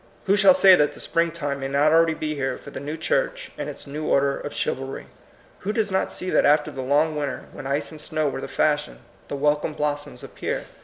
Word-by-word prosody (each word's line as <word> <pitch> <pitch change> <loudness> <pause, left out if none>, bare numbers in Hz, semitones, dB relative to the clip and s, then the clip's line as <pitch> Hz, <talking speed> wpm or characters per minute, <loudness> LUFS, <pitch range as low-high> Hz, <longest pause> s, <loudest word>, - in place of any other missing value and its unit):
Who 195 - +4
shall 205 +6 +6
say 195 -8 +7
that 150 -5 +3
the - - -12
springtime 165 -4 -1
may 135 - -3
not 140 +3 +3
already 165 0 +4
be 155 -1 -3
here 135 -2 -2
for - - -12
the - - -6
new 150 +3 -5
church - - -1
and - - -4
its - - -7
new 150 +2 -5
order 140 0 +2
of 145 - -6
chivalry? 135 +1 -3 0.5
Who 200 - -2
does 215 -2 0
not 190 - 0
see 185 - -4
that - - +4
after 150 +1 +3
the 135 - -5
long 150 +4 +2
winter, 145 -3 -3
when 135 - -7
ice 140 +4 -1
and 155 -1 -8
snow 155 0 -1
were 135 -1 -3
the - - -5
fashion, 150 -1 0 0.3
the - - -4
welcome 150 +2 +1
blossoms 145 -1 -3
appear? - - -4
150 Hz, 225 wpm, -24 LUFS, 140-165 Hz, 0.5 s, say